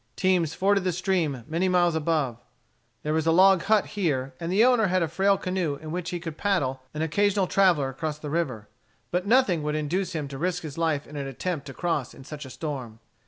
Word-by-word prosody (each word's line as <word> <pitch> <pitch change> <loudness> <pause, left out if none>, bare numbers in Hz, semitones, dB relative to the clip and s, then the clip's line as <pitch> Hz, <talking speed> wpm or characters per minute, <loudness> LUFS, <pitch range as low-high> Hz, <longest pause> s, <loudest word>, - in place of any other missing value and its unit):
Teams 180 -4 +1
forded 195 0 +2
the 185 - +1
stream 170 - -1
many 170 +4 0
miles 175 -2 +3
above. 150 -7 0 0.6
There 150 - -1
was 160 0 0
a - - +5
log 190 +1 +6
hut 215 -1 +3
here, 140 -9 -1
and 170 +1 -3
the 210 +5 +5
owner 245 -4 +4
had 185 -1 +2
a - - 0
frail 195 +5 +2
canoe 185 -6 -1
in 155 +2 -8
which 175 +1 -3
he 175 - -3
could 165 -2 -7
paddle 140 -10 0
an 155 - -1
occasional 200 +4 +2
traveller 175 -8 +3
across 150 +3 -4
the 150 -1 -7
river. 130 -11 -2 0.4
But 180 +2 -1
nothing 215 -8 +3
would 150 0 -2
induce 175 +6 -1
him 155 -3 -3
to 135 -1 -7
risk 180 0 -1
his 150 -3 -6
life 160 -3 0
in 150 - -9
an 140 -1 -3
attempt 145 +1 -4
to 135 - -8
cross 165 -8 -2
in - - -12
such 150 +1 -8
a - - -9
storm. 130 -6 -5
165 Hz, 220 wpm, -26 LUFS, 150-185 Hz, 0.6 s, log